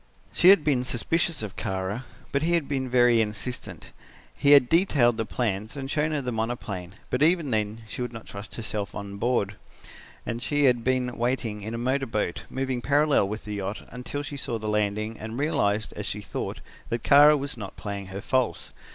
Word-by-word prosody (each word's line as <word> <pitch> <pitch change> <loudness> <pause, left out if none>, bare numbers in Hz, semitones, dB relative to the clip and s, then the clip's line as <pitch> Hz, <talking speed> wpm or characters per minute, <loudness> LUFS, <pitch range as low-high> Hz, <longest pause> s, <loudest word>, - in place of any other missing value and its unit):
"She 180 - +6
had 195 -5 +7
been 135 -5 +2
suspicious 155 +4 0
of 105 -3 -6
Kara, 95 +6 -3 0.3
but 140 - +1
he 170 +2 +1
had 160 -5 0
been 135 -2 -2
very 120 -2 +5
insistent. 110 +3 -5 0.4
He 145 0 +5
had 140 -4 +7
detailed 145 -9 +4
the 115 - -1
plans 110 +1 -2
and 135 0 -4
shown 150 +1 +1
her 150 -3 -1
the 125 - -2
monoplane, 110 -5 -4 0.2
but 125 - 0
even 160 -3 +3
then 110 0 -1
she 110 - -6
would 125 - -2
not 115 -2 -9
trust 100 +1 -7
herself 105 -3 -3
on 100 0 -6
board, 105 -3 0 0.7
and 115 +1 -3
she 145 +3 +1
had 125 -3 +4
been 125 -1 0
waiting 120 -3 -1
in 110 +3 -5
a - - -3
motor 130 +3 0
boat, 105 -6 -2
moving 130 -1 -2
parallel 145 -6 +3
with 105 +2 -5
the 105 - -5
yacht, 100 +1 -4
until 125 +4 -5
she 145 0 -6
saw 120 -3 -2
the 110 -1 -5
landing 105 +1 -1
and 110 +2 -6
realized, 120 -8 0
as - - -5
she - - -3
thought, - - -5 0.3
that 115 -1 -2
Kara 145 +2 +7
was 140 +1 -4
not 105 -5 -8
playing 100 -2 -5
her 95 +1 -6
false. 130 +1 0
120 Hz, 200 wpm, -26 LUFS, 105-140 Hz, 0.7 s, had